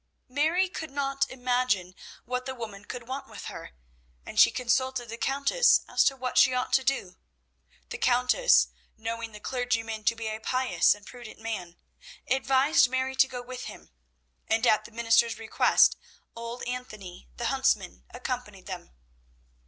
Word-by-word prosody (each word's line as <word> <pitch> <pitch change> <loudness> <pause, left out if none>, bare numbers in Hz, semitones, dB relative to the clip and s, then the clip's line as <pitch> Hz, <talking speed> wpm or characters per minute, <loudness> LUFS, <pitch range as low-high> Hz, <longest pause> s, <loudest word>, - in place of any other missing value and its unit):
Mary 315 +8 +2
could 320 -3 -6
not 275 0 -1
imagine 245 -7 0 0.3
what 250 +1 -3
the 265 - -4
woman 215 -4 -8
could 240 +1 -8
want 270 +2 -5
with - - -9
her, - - -8 0.5
and - - -3
she - - +9
consulted 255 -1 -1
the 230 - -5
Countess 280 - +3
as - - +3
to 270 - +2
what 255 -1 0
she 255 - +5
ought 250 - -2
to 265 - +4
do. 195 -10 -1 0.7
The - - -6
Countess, 250 - +4 0.3
knowing 230 +1 -4
the 210 - -10
clergyman 225 -2 -2
to 230 - +3
be 225 -1 -5
a 215 0 -4
pious 255 -1 +2
and 205 -1 -16
prudent 245 -3 -11
man, 205 -6 -5 0.5
advised 265 +1 +3
Mary 260 +1 -1
to 265 - +6
go 250 -1 -7
with 250 0 -7
him, - - -11 0.6
and 225 +2 +1
at 215 -2 +3
the - - -11
minister's 230 0 +2
request 225 -1 +3 0.4
old 235 +1 -6
Anthony 215 - -7
the - - -3
huntsman 65 - 0
accompanied - - -6
them. - - -8
245 Hz, 160 wpm, -28 LUFS, 225-260 Hz, 0.7 s, she